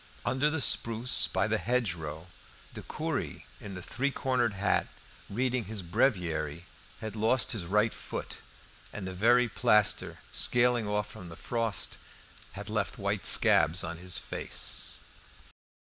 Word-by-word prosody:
Under 140 +3 +2
the 155 -1 -1
spruce 115 0 +3
by - - 0
the - - 0
hedgerow, 85 -10 -2 0.5
the - - -7
curé - - -4 0.2
in 100 -2 -8
the 90 - -8
three 140 +2 -1
cornered 125 -5 0
hat 100 +1 +1 0.4
reading 125 +2 -1
his 105 -3 -4
breviary 85 - 0 0.4
had 110 -1 -5
lost 110 +3 +2
his 105 -8 -2
right 105 +4 +2
foot, - - -6 0.5
and 105 - -6
the 95 - -5
very 120 +6 +4
plaster, 105 -2 +2
scaling 120 -2 +4
off 105 0 -2
with 90 - -9
the 85 - -9
frost, 115 -2 -2 0.5
had 100 +1 -8
left 105 -2 -2
white 100 0 0
scabs 80 +5 +5
on 85 0 -5
his 90 0 -1
face. - - -3
105 Hz, 140 wpm, -30 LUFS, 95-120 Hz, 0.5 s, scabs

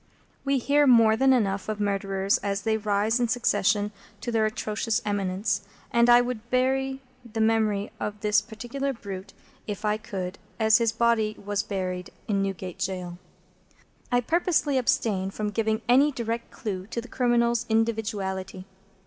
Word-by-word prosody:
We 275 0 +1
hear 285 +3 +3
more 230 -3 +6
than 265 +3 +4
enough 200 -5 +1
of 215 -1 -3
murderers 195 +1 0
as 200 0 -2
they 220 -1 +1
rise 210 +2 +1
in 240 - +2
succession 210 -3 +1 0.3
to 240 - -3
their 220 -1 +2
atrocious 215 +1 -1
eminence, 200 0 -1 0.3
and 235 0 +4
I 240 0 +8
would 240 -2 -4
bury 265 +1 +1 0.2
the 225 -2 -6
memory 220 -2 +1
of 210 0 -4
this 210 0 +3
particular 240 +5 -4
brute, 195 -5 -8 0.3
if 210 0 -4
I 210 0 +2
could, 190 -4 -5 0.2
as 220 0 +5
his 230 -2 +2
body 225 -2 +1
was 205 0 0
buried, 185 -3 -4 0.2
in 200 -2 +1
Newgate 190 -2 -4
Jail. 180 -2 -4 0.9
I 245 0 +3
purposely 315 -1 +1
abstain 200 -6 +1
from 210 +1 -3
giving 220 +1 0
any 270 +5 +5
direct 235 -3 -3
clue 195 -6 -5
to 235 - -4
the 240 - -7
criminal's 240 -2 +1
individuality. 210 -4 -1
220 Hz, 155 wpm, -26 LUFS, 200-240 Hz, 0.9 s, I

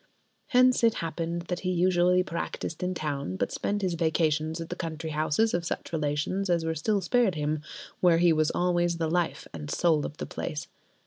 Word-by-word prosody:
Hence 255 -2 +4
it 230 -1 +5
happened 165 +1 -3
that 175 0 -3
he 185 - -2
usually 180 0 +3
practised 170 -2 -4
in 180 0 -1
town, 140 - -3
but - - -1
spent 205 0 -2
his 185 -2 +1
vacations 160 -1 0
at 165 - -6
the 175 - -3
country 160 -2 -5
houses 155 +8 +1
of 175 - 0
such 170 - -4
relations 155 +5 -1
as 170 -2 +2
were 160 - 0
still 200 +6 0
spared 195 +1 +2
him, 150 0 -1 0.4
where 175 -2 +5
he 170 -1 +5
was 155 -1 +2
always 175 -1 +1
the 165 -1 0
life 175 -1 0
and 75 -2 -7
soul 160 -4 +2
of 150 - -12
the - - -4
place. 150 - -5
170 Hz, 195 wpm, -28 LUFS, 155-180 Hz, 0.4 s, it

